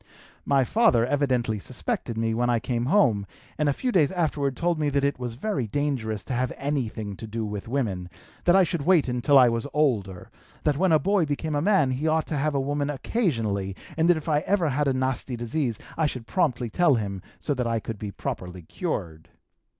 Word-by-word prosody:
"My 140 -1 +4
father 125 - +3
evidently 125 -6 0
suspected 130 - -4
me 115 0 0
when 120 +2 +1
I 120 -1 +2
came 120 +1 -2
home, 125 - +3 0.3
and 150 -1 +2
a - - +4
few 250 - -2
days 165 -8 +3
afterward 150 -7 -1
told 170 -1 0
me 150 -1 +1
that 140 0 0
it 140 -2 0
was 120 -2 -4
very 140 - -2
dangerous 115 -6 -2
to - - -5
have 125 +1 0
anything 115 -8 -3
to 110 - -8
do 110 +1 -3
with 105 +1 -5
women, 105 -9 -2 0.4
that 175 - +5
I 195 - +7
should 170 -2 -1
wait 175 -3 +4
until 125 +3 +3
I 130 -2 +8
was 115 +3 -1
older, 105 -12 0 0.3
that 150 - +2
when 185 +4 +2
a 155 - +7
boy 190 0 +1
became 150 +2 -2
a 145 - +1
man 180 -7 +3
he 135 +5 -1
ought 160 0 +2
to 155 - -3
have 150 +1 0
a - - +2
woman 145 +1 -1
occasionally, 115 - -1 0.2
and 160 +2 +2
that 175 - +5
if 155 - -7
I 150 -2 +3
ever 180 -1 +1
had 145 +2 0
a 135 - +2
nasty 130 0 -1
disease 120 0 -1 0.2
I 160 -2 +2
should 125 -5 -5
promptly 125 - 0
tell 170 -2 +4
him 100 -4 -3 0.2
so 145 - -1
that 125 -3 -1
I 115 -1 0
could 110 -1 -6
be 105 - -4
properly 90 -2 -6
cured. 85 - -5
135 Hz, 215 wpm, -26 LUFS, 115-155 Hz, 0.4 s, I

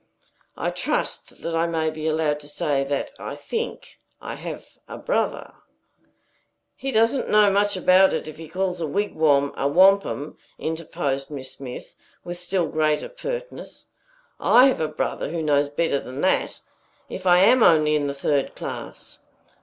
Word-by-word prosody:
I - - -1
trust - - -3
that 170 - -2
I 165 +1 +1
may 160 -1 -1
be 155 0 -5
allowed 155 -1 0
to 145 - -12
say 145 -1 -1
that 140 0 -2
I - - -6
think 465 0 -5 0.2
I - - -6
have - - -7 0.2
a - - -8
brother" - - -2 1.2
"He 270 - -4
doesn't 230 +3 +2
know 210 -1 +5
much 200 0 +1
about 185 +1 +5
it, - - -3
if 155 - -9
he 160 -1 -10
calls 180 0 -2
a 160 - -1
wigwam 150 -5 +1
a 140 - 0
wampum," 185 -2 +3 0.2
interposed 155 -4 -3
Miss 135 -3 -6
Smith, 125 -2 -9 0.3
with 175 0 -6
still 180 0 -1
greater 155 -1 0
pertness. - - -7 0.5
"I 250 - +6
have 260 - -2
a 155 - +1
brother - - -3
who 165 0 -3
knows 145 -1 +2
better 145 -1 0
than 130 +2 -7
that, 190 - 0 0.5
if 185 0 -6
I 180 0 +6
am 250 +6 +5
only 155 -5 +5
in 145 -1 +1
the 140 - -3
third 140 0 0
class." - - -8
160 Hz, 160 wpm, -23 LUFS, 145-190 Hz, 1.2 s, I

